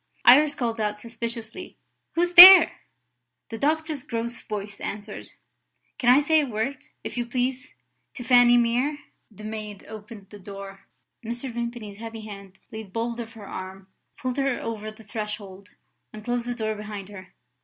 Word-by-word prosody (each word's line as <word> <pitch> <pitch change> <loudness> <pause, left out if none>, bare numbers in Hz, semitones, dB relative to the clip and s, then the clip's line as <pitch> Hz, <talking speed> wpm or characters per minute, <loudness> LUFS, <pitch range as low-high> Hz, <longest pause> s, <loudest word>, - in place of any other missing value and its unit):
Iris 290 +4 +6
called 230 -3 -3
out 210 0 -2
suspiciously: 235 - -7 0.4
"Who's 350 +1 0
there?" 360 0 +11 0.7
The 225 - -7
doctor's 310 0 -1
gross 235 0 -5
voice 205 -1 -7
answered: 210 +1 -7 0.7
"Can 245 - +2
I 260 - +6
say 315 +1 +3
a 285 - -3
word, 250 +4 -4 0.2
if - - -7
you 240 - -2
please, 255 +1 -3 0.4
to 250 - -7
Fanny 245 -1 +5
Mere?" 245 +5 +1 0.3
The 215 -1 -14
maid 215 -2 -7
opened 210 -2 -11
the 205 - -11
door. 195 0 -11 0.4
Mr. 240 +3 -5
Vimpany's 235 -3 -6
heavy 225 0 -8
hand 200 -3 -11
laid 220 -3 -9
bold 230 +2 -3
of 230 -1 -7
her 215 -4 -12
arm, 190 +1 -9 0.3
pulled 255 0 -4
her 275 -2 0
over 215 -1 -5
the 215 +1 -14
threshold, 205 -2 -7 0.4
and 215 0 -11
closed 240 0 -2
the 245 - -3
door 220 -2 -2
behind 210 -2 -8
her. 190 -2 -13
230 Hz, 160 wpm, -24 LUFS, 210-245 Hz, 0.7 s, there